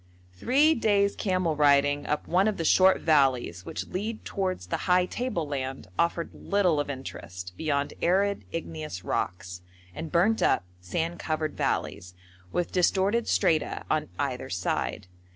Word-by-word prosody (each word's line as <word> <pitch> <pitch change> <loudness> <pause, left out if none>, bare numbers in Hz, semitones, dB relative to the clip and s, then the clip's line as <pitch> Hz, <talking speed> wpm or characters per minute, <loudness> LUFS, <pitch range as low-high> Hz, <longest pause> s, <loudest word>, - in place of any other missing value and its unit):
Three 275 - +3
days' 205 -5 +2
camel 185 -5 0
riding 145 0 +3
up 150 - -2
one 185 +4 +3
of 215 - 0
the 165 - -2
short 190 +3 +5
valleys 130 - +2
which - - -4
lead 215 +4 -4
towards 185 - -2
the 90 - -2
high 180 0 +5
table 185 -7 -3
land 135 -6 -4
offered 170 0 0
little 185 -6 +1
of 145 - -2
interest 90 -9 -7
beyond 145 -3 -1
arid, 200 +3 +2
igneous 155 - -5
rocks, 90 0 -3 0.3
and 160 - -6
burnt 190 +6 +3
up, - - +3 0.2
sand 160 - -3
covered 155 -1 -2
valleys, 100 -9 -2 0.4
with 175 - -1
distorted 195 +5 +2
strata 165 -6 +1
on 155 -1 0
either - - -3
side. 90 0 -2
160 Hz, 145 wpm, -27 LUFS, 140-190 Hz, 0.4 s, short